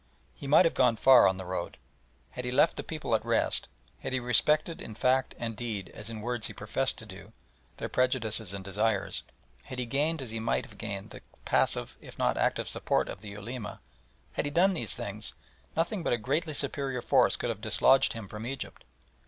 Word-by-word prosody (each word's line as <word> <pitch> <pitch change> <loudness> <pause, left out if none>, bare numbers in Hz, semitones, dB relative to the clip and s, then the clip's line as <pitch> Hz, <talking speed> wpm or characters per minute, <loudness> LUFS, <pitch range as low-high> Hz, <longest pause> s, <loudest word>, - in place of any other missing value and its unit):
He 140 - -8
might 150 +6 +7
have 165 - +3
gone 125 -3 +4
far 130 +3 +7
on 95 - +1
the 95 - -6
road. 90 +1 -4 0.5
Had 125 - -5
he 125 - -2
left 140 +6 +4
the - - -4
people 155 -7 -3
at 110 - +2
rest, - - +1 0.3
had 130 - -4
he 130 - +2
respected 150 +6 +2
in 110 - -8
fact 130 +3 +2
and 115 -1 -4
deed 105 -6 -4
as 105 +1 -8
in 110 -2 -6
words 120 0 -2
he - - -8
professed 130 +6 -2
to 110 - -7
do, 100 +1 -12 0.4
their - - -3
prejudices 115 -5 +1
and 95 -1 -6
desires, 100 +1 0 0.4
had 130 - -7
he 125 - -1
gained 150 +7 0
as 130 -5 -5
he 115 - -3
might 115 - 0
have - - -16
gained 105 0 -5
the - - -10 0.2
passive - - +1
if - - -12
not - - +2
active - - 0
support - - 0
of - - -7
the 105 - -8
Ulema 105 +3 -6 0.5
had - - -1
he - - -1
done 180 +6 +4
these 115 - -1
things, - - -6 0.4
nothing 175 +4 0
but 165 - +1
a - - +3
greatly 150 +7 -1
superior 135 -3 -2
force 130 -3 +4
could 120 - -2
have 105 -2 -7
dislodged 115 +4 +4
him 115 -4 -7
from 105 +2 -7
Egypt. 135 0 -6
120 Hz, 210 wpm, -30 LUFS, 105-135 Hz, 0.5 s, might